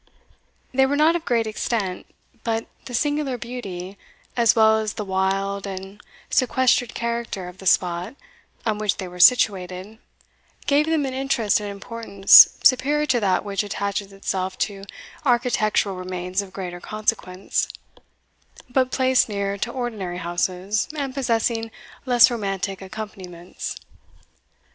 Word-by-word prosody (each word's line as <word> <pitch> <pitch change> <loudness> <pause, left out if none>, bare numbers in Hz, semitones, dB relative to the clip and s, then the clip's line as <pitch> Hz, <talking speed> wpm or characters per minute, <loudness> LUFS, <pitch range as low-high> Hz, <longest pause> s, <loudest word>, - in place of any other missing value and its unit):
They 265 +1 +4
were 285 - 0
not 310 +3 +4
of 340 - -3
great 230 -2 +1
extent; 215 -3 -3 0.4
but 225 -1 -1 0.2
the 250 - -8
singular 290 -1 0
beauty, 200 -6 -7 0.4
as 235 -2 +4
well 220 -1 +5
as 215 -1 -3
the 210 - -5
wild 195 +1 -1
and 195 +1 -8 0.3
sequestered 250 -1 +2
character 235 -5 -3
of 180 +1 -11
the 190 - -5
spot 180 +5 +1 0.5
on 215 -2 0
which 210 -2 0
they 190 - -5
were 180 0 -11
situated, 190 -1 +3 0.7
gave 290 +2 +3
them 320 -3 +1
an 265 - -4
interest 260 -6 +1
and 205 -1 -5
importance 200 -1 +6
superior 280 +4 +4
to 255 -4 +2
that 190 -2 +1
which 200 -1 -1
attaches 200 -1 -3
itself 190 -1 -3
to 200 -2 -3 0.4
architectural 235 -6 +1
remains 185 +1 -3
of 195 -2 -10
greater 180 -2 -6
consequence, 215 -3 -2 1.0
but 255 0 +2
placed 260 -2 +2
near 200 -1 -2
to 235 +4 -3
ordinary 220 -8 -4
houses, 180 +4 -1
and 275 -3 -3
possessing 230 -3 0 0.4
less 245 0 +6
romantic 195 -4 -3
accompaniments. 190 -3 -7
210 Hz, 135 wpm, -23 LUFS, 190-245 Hz, 1.0 s, importance